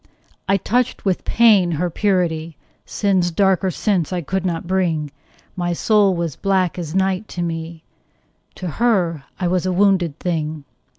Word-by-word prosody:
I 195 - +4
touched 245 +6 -1
with 190 -2 0
pain 205 -7 +4
her 175 +3 -1
purity; 170 -5 0 0.3
Sin's 190 -4 +1
darker 190 +1 +2
sense 185 -3 0
I 180 -1 -1
could 190 +4 -2
not 165 -1 -3
bring: 170 -5 0 0.4
My 175 -1 -1
soul 205 +1 +3
was 170 -4 -3
black 190 -3 0
as 165 -1 -5
night 190 +2 0
to 175 - -4
me: 165 -1 -5 0.7
To 185 - -6
her 175 - 0
I 180 - 0
was 185 +1 0
a - - +1
wounded 180 -5 +2
thing. 155 -4 -3
180 Hz, 155 wpm, -20 LUFS, 165-195 Hz, 0.7 s, I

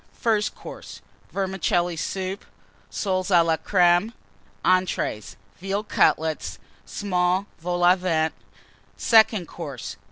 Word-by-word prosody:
FIRST 215 -2 0
COURSE. - - -10 0.3
Vermicelli 185 -3 0
Soup. 190 +4 -4 0.5
Soles 185 -2 -2
à 175 -3 +5
la 165 -1 +2
Crême. 180 +4 +2 0.5
ENTREES. 185 - 0 0.2
Veal 195 +3 -2
Cutlets. 160 -6 +1 0.3
Small 185 -2 0
Vols 175 +1 0
au 180 +1 +7
Vent. 160 -3 0 0.6
SECOND 220 -5 +4
COURSE. 150 -6 -7
185 Hz, 100 wpm, -24 LUFS, 175-195 Hz, 0.6 s, au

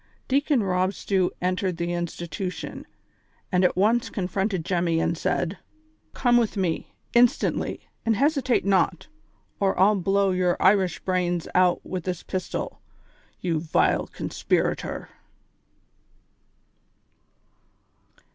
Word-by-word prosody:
Deacon 275 -2 +2
Rob 185 0 0
Stew 190 -3 +1
entered 185 -1 0
tlie 170 0 -2
institution, 175 +2 -5 0.6
and 180 0 +3
at 180 - +3
once 225 +5 +2
confronted 190 -2 -2
.Temmy, 170 -2 +1
and 170 - 0
said: 175 +3 -1 0.6
"Come 245 -2 +3
with 230 -3 +1
me, 180 -4 -2 0.2
instantly, 240 0 +2 0.2
and 225 -1 +2
hesitate 275 -2 +2
not, 190 -3 +2 0.5
or 195 -1 +2
1*11 195 0 +3
blow 195 +1 +2
your 180 -1 +1
Irish 190 -1 +3
brains 180 -2 -1
out 180 -1 +3
with 185 -3 -5
this 180 -2 -3
pistol, 185 -1 -4 0.6
you 170 -3 0
vile 155 0 +1
conspirator - - -2
185 Hz, 110 wpm, -25 LUFS, 175-200 Hz, 0.6 s, and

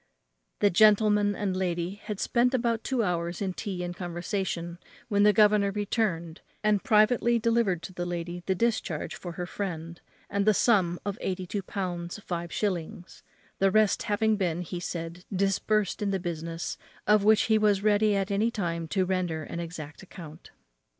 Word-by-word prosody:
The 205 - +4
gentleman 210 +1 +4
and 195 -2 -2
lady 180 +1 -2
had 210 -2 -4
spent 250 +2 +2
about 235 -2 0
two 255 -4 0
hours 170 -2 -2
in 190 -2 -2
tea 185 -2 -4
and 175 0 -4
conversation, 175 -1 -3 0.3
when 205 -2 +2
the 210 +1 +7
governor 210 -1 +4
returned, 195 -5 -2 0.2
and 210 -2 +2
privately 235 0 +4
delivered 225 -7 +1
to 185 - -7
the 175 0 -4
lady 175 0 -4
the 190 - +2
discharge 215 -7 -1
for 175 -2 -7
her 175 +2 -4
friend, 170 -3 -5 0.3
and 200 +1 -1
the 215 - +5
sum 185 -7 +3
of 205 +1 -3
eighty 185 -1 -2
two 200 +3 -3
pounds 180 -3 -4
five 175 -4 -5
shillings; 175 -3 -3 0.4
the 195 - +4
rest 215 0 +3
having 215 +1 +1
been, 175 -3 -1
he 175 +1 -5
said, 170 0 -5
disbursed 200 +1 0
in 205 - 0
the 195 -1 0
business, 165 -1 -4 0.3
of 210 -1 +4
which 215 +1 +5
he 220 -1 +3
was 205 -2 +2
ready 210 0 +3
at 195 0 -1
any 210 +3 +2
time 170 -7 -3
to 185 +2 +1
render 180 -4 -1
an 170 - -6
exact 160 -3 -7
account. 170 -4 -11
195 Hz, 170 wpm, -28 LUFS, 175-210 Hz, 0.4 s, the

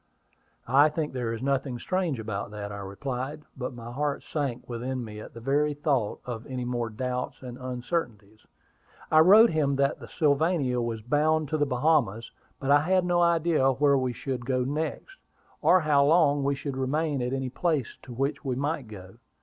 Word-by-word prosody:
"I 140 +5 +5
think 150 -1 -3
there 120 -3 -2
is 115 +2 -5
nothing 135 -2 -1
strange 175 -2 -1
about 105 -3 -4
that," 105 -1 -6
I 100 - -6
replied; 130 +9 -5
but 125 -1 -5
my 120 0 -8
heart 145 +2 -2
sank 140 -6 -3
within 125 +1 -4
me 105 -1 -8
at 110 - -11
the - - -7
very 145 +4 +1
thought 140 -7 -1
of 120 -2 -5
any 130 -2 -4
more 120 -2 -2
doubts 125 +3 -4
and 125 -1 -7
uncertainties. 120 - -4 0.6
"I 155 - +6
wrote 210 +8 +8
him 145 -3 +1
that 140 +1 +1
the - - -10
Sylvania 145 -4 +1
was 115 -2 -3
bound 150 +4 +1
to 155 - 0
the 145 - +2
Bahamas; 125 -5 +1 0.3
but 135 0 -1
I 145 - +7
had 185 +3 +2
no 175 0 +2
idea 165 -5 +3
where 140 +2 +3
we 130 -2 0
should 125 0 -4
go 130 0 0
next, 155 - -4 0.4
or 185 - +5
how 145 -3 +3
long 145 -2 +4
we 140 0 +1
should 140 -1 -5
remain 145 +1 0
at 125 0 -2
any 135 -1 -2
place 150 -3 -1
to 130 - -12
which 135 +4 -2
we 130 -3 -1
might 145 -1 -2
go. 95 0 -11
135 Hz, 190 wpm, -27 LUFS, 120-150 Hz, 0.6 s, wrote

